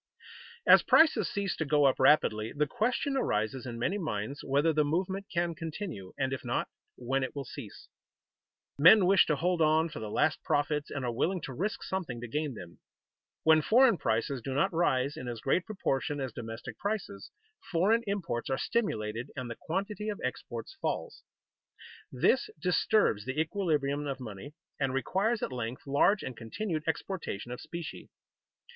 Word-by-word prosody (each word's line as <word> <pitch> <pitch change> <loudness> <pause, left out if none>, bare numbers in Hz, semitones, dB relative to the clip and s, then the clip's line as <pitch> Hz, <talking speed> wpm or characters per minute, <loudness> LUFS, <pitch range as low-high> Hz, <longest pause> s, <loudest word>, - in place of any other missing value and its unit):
_ - - -25 0.5
As - - +8
prices 310 - +5
cease 200 -2 -2
to - - 0
go 150 -1 +3
up 135 - +3
rapidly, 115 -6 +4
the 150 +1 +1
question 250 - -1
arises 125 - -1
in 120 -1 -5
many 185 - -1
minds 140 - -4
whether 145 +4 +2
the 155 0 +3
movement 185 +6 -1
can 170 -1 0
continue, 160 - -6
and 135 -1 0
if 135 - -5
not, - - -1 0.3
when 130 +2 -1
it 130 - -4
will 140 -1 -4
cease. - - -10 0.9
Men 180 +6 +8
wish 190 +1 +5
to 150 - +2
hold 175 +3 0
on 160 +1 +3
for - - -7
the 110 -1 -5
last 155 +8 +1
profits, 150 0 0
and 140 -3 -4
are 120 - -1
willing 180 +10 0
to 135 - -6
risk 200 - -3
something 170 -11 -4
to 120 - -6
gain 150 +1 -2
them. 85 -4 -11 0.6
When 160 0 +6
foreign 240 - +5
prices 115 +4 0
do 130 +3 -4
not 190 +6 +2
rise 140 -4 +1
in 125 - -7
as 120 -2 -4
great 175 +9 0
proportion 145 -8 -1
as 130 -4 -4
domestic 115 0 -7
prices, 200 - -4 0.4
foreign 200 +7 +3
imports 170 -14 -2
are 135 - 0
stimulated 115 - -2
and 120 -2 -5
the - - -5
quantity 200 - -3
of 205 - -4
exports 125 - -5
falls. 470 - -3 0.9
This - - +2
disturbs 180 - +2
the 130 +3 -3
equilibrium 150 -5 0
of 135 -1 -3
money 125 +5 -8 0.2
and 135 -2 0
requires 195 - 0
at - - -2
length 120 0 -5
large 145 +9 +3
and 130 - -5
continued 155 - -4
exportation 160 - -3
of 125 - -6
specie. 170 -2 -7
150 Hz, 175 wpm, -30 LUFS, 125-185 Hz, 0.9 s, As